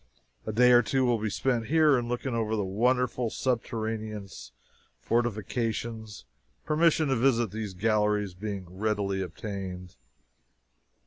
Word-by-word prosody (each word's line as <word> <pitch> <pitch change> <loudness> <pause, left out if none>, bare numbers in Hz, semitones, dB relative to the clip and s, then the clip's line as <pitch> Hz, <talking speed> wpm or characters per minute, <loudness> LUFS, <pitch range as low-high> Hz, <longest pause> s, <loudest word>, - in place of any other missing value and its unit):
A - - 0
day 125 +3 +5
or 120 0 +7
two 130 +4 +1
will 120 -2 +2
be 105 0 -1
spent 120 0 -1
here 155 -2 +5
in 120 -2 -1
looking 120 +1 -2
over 110 -1 0
the 105 -2 -1
wonderful 125 +4 +1
subterraneous 110 - -3 0.5
fortifications, 115 - -2 0.4
permission 155 -1 +3
to 135 - +2
visit 120 -4 +2
these 105 -3 -5
galleries 105 -1 +1
being 100 0 -5
readily 100 +1 -1
obtained. 90 - -6
110 Hz, 125 wpm, -28 LUFS, 105-120 Hz, 0.5 s, or